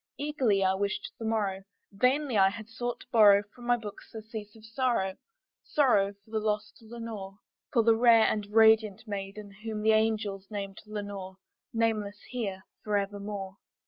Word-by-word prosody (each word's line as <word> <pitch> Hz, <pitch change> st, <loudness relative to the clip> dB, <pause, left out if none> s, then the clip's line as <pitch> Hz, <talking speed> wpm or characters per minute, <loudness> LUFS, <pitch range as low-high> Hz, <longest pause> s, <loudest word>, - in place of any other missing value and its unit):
Eagerly 265 Hz, -9 st, +1 dB
I 190 Hz, 0 st, +3 dB
wished 200 Hz, +1 st, -2 dB
the 225 Hz, -, -5 dB
morrow; 205 Hz, -4 st, 0 dB, 0.3 s
vainly 255 Hz, +5 st, +1 dB
I 195 Hz, -1 st, +6 dB
had 215 Hz, +2 st, -8 dB
sought 240 Hz, +1 st, -4 dB
to -, -, -15 dB
borrow 205 Hz, -3 st, +7 dB
From 240 Hz, -1 st, -11 dB
my 245 Hz, 0 st, +4 dB
books 210 Hz, -3 st, -9 dB
surcease 220 Hz, -1 st, -8 dB
of 220 Hz, -1 st, -15 dB
sorrow 225 Hz, -5 st, 0 dB, 0.5 s
sorrow 205 Hz, -9 st, +3 dB
for 220 Hz, -, -21 dB
the 220 Hz, -, 0 dB
lost 210 Hz, 0 st, -2 dB
Lenore, 220 Hz, -4 st, -7 dB, 0.3 s
For 235 Hz, -5 st, +3 dB
the 225 Hz, 0 st, +5 dB
rare 230 Hz, -1 st, +6 dB
and 210 Hz, -2 st, 0 dB
radiant 220 Hz, -1 st, +4 dB
maiden 200 Hz, 0 st, -6 dB
whom 215 Hz, -2 st, -4 dB
the 220 Hz, -, +5 dB
angels 215 Hz, -3 st, 0 dB
name 200 Hz, -2 st, -4 dB
Lenore, 205 Hz, -3 st, -6 dB, 0.4 s
Nameless 215 Hz, -3 st, 0 dB
here 200 Hz, -7 st, -3 dB, 0.2 s
forevermore. 200 Hz, -1 st, -3 dB
215 Hz, 155 wpm, -29 LUFS, 200-225 Hz, 0.5 s, borrow